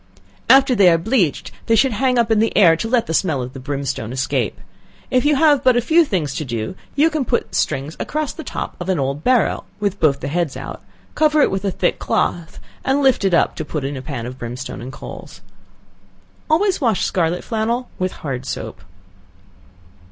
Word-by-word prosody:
After 270 0 +6
they 200 -6 +6
are 165 - +4
bleached, 175 - 0 0.2
they 225 - +4
should 260 +4 +3
hang 250 +3 +1
up 235 -1 +2
in 220 - +4
the 225 +1 +1
air 175 -6 +7
to 195 - -3
let 240 -1 +2
the 160 - -4
smell 160 -5 +1
of 125 0 -5
the 135 - -8
brimstone 135 -4 -4
escape. 130 -4 -1 0.5
If 255 +2 +2
you 295 0 +4
have 290 -2 +4
but 255 -2 +4
a - - +5
few 320 +8 +4
things 165 - -2
to - - -2
do, 115 -2 -4 0.2
you 310 +4 +3
can 310 -3 0
put 240 -1 -2
strings 140 +4 -1
across 305 -2 -2
the 320 - -8
top - - -5
of 175 +1 -5
an 185 - +1
old 140 +2 -2
barrel, 250 -4 +2
(with 205 -1 -2
both 140 -4 +3
the 140 - -5
heads 160 -1 -1
out,) - - -7 0.3
cover 305 -1 +3
it - - +2
with 190 0 -2
a - - +2
thick 180 -1 -1
cloth, 165 -2 -1 0.2
and 275 +2 +1
lift 265 -6 +3
it 190 -3 +3
up - - +2
to 160 - -3
put 150 -1 -4
in 140 +1 -3
a 130 - -5
pan 130 -5 -5
of 125 +1 -8
brimstone 120 +1 -6
and 125 +2 -7
coals. 95 -7 -10 1.1
Always 365 +3 +2
wash 230 -7 +1
scarlet 175 -1 0
flannel 230 +2 -1
with 185 0 -1
hard 130 -2 -4
soap. - - -6
185 Hz, 210 wpm, -20 LUFS, -, 1.1 s, air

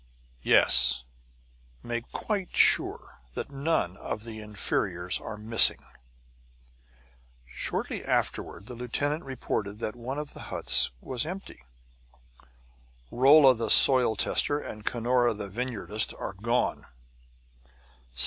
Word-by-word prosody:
"Yes. 60 +1 +4 0.8
Make 120 0 -5
quite 200 -4 -4
sure - - +2 0.2
that - - -6
none 140 - -2
of 105 - -5
the 115 -1 -8
inferiors 95 -3 -2
are 110 - -8
missing." 110 +2 +4 1.6
Shortly - - -4
afterward - - -2
the 125 - -8
lieutenant 145 +6 -3
reported 105 -6 -4
that 110 0 -5
one 125 +3 -6
of 150 -1 -5
the - - -11
huts - - +2
was 125 -3 -3
empty. 185 - -8 1.5
"Rolla, 135 +1 +6
the 115 -2 -4
soil 125 -3 +7
tester, 145 +7 +1
and 105 -6 -9
Cunora, 120 +1 0
the 100 -1 -6
vineyardist, 110 -1 -3
are - - -5
gone." 115 +6 -2
120 Hz, 110 wpm, -27 LUFS, 105-135 Hz, 1.6 s, soil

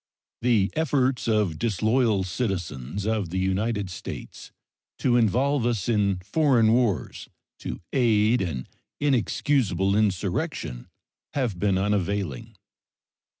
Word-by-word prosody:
The 115 -5 +2
efforts 135 -6 +1
of 105 -8 +1
disloyal 110 -1 +1
citizens 90 - -3
of 110 -5 -1
the 90 - -3
United 95 +1 -1
States 90 - -8 0.5
to 125 -2 +2
involve 125 +4 +2
us 115 -5 -1
in 105 -4 +2
foreign 120 - +3
wars 115 -7 0 0.3
to - - -6
aid 115 -2 +3
an 80 -9 -3 0.3
inexcusable 120 - +1
insurrection 95 - -1 0.5
have 120 -10 -1
been 100 -1 +2
unavailing. 100 -6 -1
105 Hz, 105 wpm, -25 LUFS, 95-120 Hz, 0.5 s, foreign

